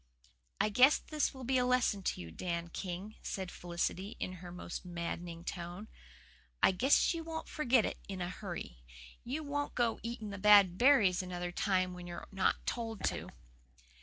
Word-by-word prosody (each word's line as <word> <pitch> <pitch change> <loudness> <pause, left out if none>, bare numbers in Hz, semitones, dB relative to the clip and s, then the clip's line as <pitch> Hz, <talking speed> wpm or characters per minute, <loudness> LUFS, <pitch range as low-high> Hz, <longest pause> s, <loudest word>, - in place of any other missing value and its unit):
"I - - +3
guess 255 +7 +6
this 305 -1 -1
will 265 -2 -9
be 260 +1 +2
a - - +3
lesson 250 -5 +2
to 185 - -2
you, 85 -1 -8
Dan 170 - -3
King," 185 +4 -6
said 190 -2 -4
Felicity, 175 +3 -3
in 185 - -3
her 175 -1 -8
most 180 0 -6
maddening 170 -1 -5
tone. 180 +4 -6 0.7
"I - - +7
guess 255 - +4
you 330 -1 -4
won't 320 0 -5
forget 255 -6 +3
it - - -4
in 195 -1 -5
a 175 - -2
hurry. 175 - -6 0.4
You 285 +6 -3
won't 290 0 -3
go 235 -2 +1
eating 230 -3 -5
the 200 - -6
bad 200 -3 +7
berries 220 -9 +5
another 180 -1 -4
time 185 -1 +1
when 180 0 -8
you're 175 0 -7 0.4
told 225 -3 -3
not - - +2
to." - - -6
195 Hz, 175 wpm, -33 LUFS, 175-245 Hz, 0.7 s, I